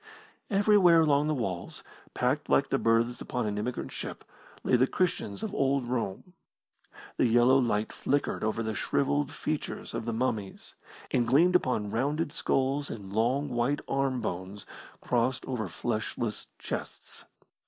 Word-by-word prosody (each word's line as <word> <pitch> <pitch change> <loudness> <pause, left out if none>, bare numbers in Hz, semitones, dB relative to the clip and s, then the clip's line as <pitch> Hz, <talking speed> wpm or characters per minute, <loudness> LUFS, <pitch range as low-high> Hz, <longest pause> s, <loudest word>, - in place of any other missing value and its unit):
Everywhere 195 -5 +5
along 150 -1 +3
the 155 - +1
walls, 95 -9 -4 0.3
packed - - 0
like - - +3
the - - +1
berths 115 +1 +2
upon 125 -2 -2
an 105 0 -2
emigrant 120 +4 -3
ship, - - -6 0.4
lay - - +3
the 125 +2 +4
Christians 165 - -1
of 215 -2 -3
old 135 -5 +1
Rome. 120 - -3 0.8
The - - +4
yellow 120 +3 +5
light 110 -4 0
flickered 140 +1 -1
over 110 +1 0
the 110 0 -2
shrivelled 140 +7 0
features 155 -1 -4
of - - -3
the 115 - -1
mummies, 110 -4 -3 0.4
and 120 -2 +2
gleamed 165 +9 +4
upon 115 - +1
rounded 145 +7 -1
skulls 135 +2 0
and 100 -3 -7
long, 125 +7 +1
white 125 +4 0
arm 135 -2 0
bones 95 0 -5 0.4
crossed 125 +2 0
over 120 -6 -3
fleshless 110 +3 -3
chests. - - -7
125 Hz, 145 wpm, -29 LUFS, 110-145 Hz, 0.8 s, Everywhere